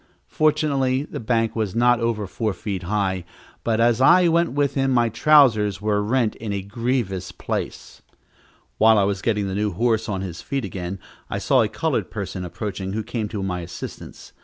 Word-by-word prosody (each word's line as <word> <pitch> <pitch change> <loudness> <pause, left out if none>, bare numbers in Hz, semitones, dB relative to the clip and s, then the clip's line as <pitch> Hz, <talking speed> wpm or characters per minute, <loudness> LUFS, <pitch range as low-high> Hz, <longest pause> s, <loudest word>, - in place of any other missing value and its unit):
Fortunately 140 -4 +1
the - - -7
bank 115 -1 0
was 110 -3 -2
not 120 0 +4
over 115 -3 -1
four 100 +3 -2
feet 95 0 -4
high, 95 -1 -1 0.4
but 115 -1 0
as 120 +1 +3
I 175 +6 +6
went 170 -1 +2
with 145 -1 +1
him, 135 -1 +1
my 120 -3 +3
trousers 110 -6 +4
were 105 0 0
rent 115 +1 +1
in 110 -2 -5
a 100 -1 -3
grievous 100 -4 -2
place. - - -5 0.8
While 110 0 +6
I 100 - +4
was 100 -1 -1
getting 105 -3 0
the 95 - -3
new 105 0 -1
horse 115 +2 0
on 95 -2 -2
his 90 -3 -6
feet 135 -4 -3
again, 95 0 -5 0.3
I - - -2
saw - - +3
a - - +2
colored - - -2
person 90 - -5
approaching, 95 +2 -5
who 110 +1 -2
came 110 0 -3
to 105 -2 -4
my 90 -2 -2
assistance. 85 0 -9
110 Hz, 185 wpm, -23 LUFS, 95-120 Hz, 0.8 s, I